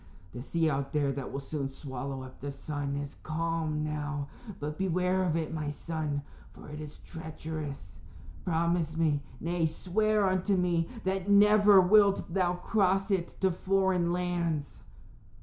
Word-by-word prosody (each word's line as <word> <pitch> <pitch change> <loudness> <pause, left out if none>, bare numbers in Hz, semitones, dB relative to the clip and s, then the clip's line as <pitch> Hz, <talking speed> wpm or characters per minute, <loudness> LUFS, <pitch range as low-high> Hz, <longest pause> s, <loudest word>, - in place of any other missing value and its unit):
The 125 - -6
sea 165 +4 0
out 140 -2 -1
there 145 -2 +2
that 135 -1 -5
will 140 - -3
soon 140 0 -3
swallow 135 -1 -6
up 130 0 -12
the 145 - -4
sun 140 0 -4
is 140 0 -6
calm 160 -1 -1
now. 150 -2 -3 0.3
But 150 +1 -4
beware 185 0 +1
of 175 -4 +1
it, 160 -1 -2
my 155 -2 -2
son, 150 -1 -3 0.3
for - - -12
it 150 +1 -7
is 150 -1 -8
treacherous. 155 - -7 0.5
Promise 165 -1 0
me 155 -3 +2 0.2
nay, 170 0 0
swear 210 +5 +1
unto 185 +1 +2
me 175 -2 +1
that 190 +1 -1
never 205 0 +7
wilt 195 -1 +4
thou 180 -2 +2
cross 195 +1 +1
it 185 -3 0
to 190 -1 +4
foreign 185 -1 +1
lands." 175 -4 -1
165 Hz, 150 wpm, -30 LUFS, 145-185 Hz, 0.5 s, never